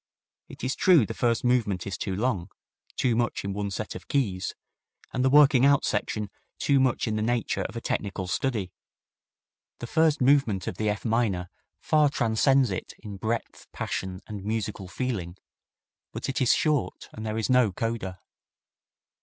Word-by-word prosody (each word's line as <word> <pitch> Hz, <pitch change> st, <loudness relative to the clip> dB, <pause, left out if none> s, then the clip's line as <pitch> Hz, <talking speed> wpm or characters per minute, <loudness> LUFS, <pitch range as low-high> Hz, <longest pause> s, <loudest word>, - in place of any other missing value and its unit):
It -, -, -11 dB
is 130 Hz, +1 st, 0 dB
true 170 Hz, -, +5 dB
the -, -, -5 dB
first 115 Hz, -2 st, +1 dB
movement 115 Hz, -7 st, +1 dB
is 100 Hz, -, -3 dB
too 95 Hz, -3 st, -3 dB
long, 105 Hz, -4 st, -1 dB, 0.5 s
too 120 Hz, -3 st, +1 dB
much 120 Hz, 0 st, 0 dB
in 100 Hz, -, -2 dB
one 100 Hz, 0 st, -2 dB
set 105 Hz, +2 st, -4 dB
of -, -, -10 dB
keys, 100 Hz, -10 st, -1 dB, 0.6 s
and 125 Hz, -, 0 dB
the 130 Hz, -, +4 dB
working 140 Hz, -2 st, +6 dB
out 140 Hz, 0 st, +5 dB
section 105 Hz, -2 st, -2 dB, 0.3 s
too 140 Hz, -1 st, +2 dB
much 130 Hz, -2 st, +1 dB
in 110 Hz, -1 st, -1 dB
the -, -, -1 dB
nature 120 Hz, +1 st, 0 dB
of -, -, -5 dB
a -, -, -4 dB
technical 95 Hz, -2 st, -2 dB
study. 100 Hz, 0 st, -1 dB, 1.1 s
The -, -, -6 dB
first 160 Hz, +3 st, +2 dB
movement 125 Hz, -8 st, +3 dB
of 90 Hz, -, -4 dB
the 110 Hz, -1 st, 0 dB
F 105 Hz, -1 st, -3 dB
minor 110 Hz, -6 st, 0 dB, 0.3 s
far 150 Hz, -2 st, +3 dB
transcends 130 Hz, 0 st, +2 dB
it 95 Hz, -, -5 dB
in 100 Hz, -2 st, -8 dB
breadth, 110 Hz, +3 st, -3 dB
passion 95 Hz, 0 st, -4 dB
and 105 Hz, -3 st, -7 dB
musical 105 Hz, -2 st, -3 dB
feeling, 95 Hz, -4 st, -3 dB, 0.7 s
but -, -, -5 dB
it 135 Hz, +1 st, -2 dB
is 125 Hz, -, +5 dB
short 150 Hz, -4 st, 0 dB
and 110 Hz, -, -7 dB
there 110 Hz, 0 st, -3 dB
is 110 Hz, -, 0 dB
no 125 Hz, -5 st, +4 dB
coda. 95 Hz, -3 st, -4 dB
115 Hz, 170 wpm, -27 LUFS, 100-130 Hz, 1.1 s, working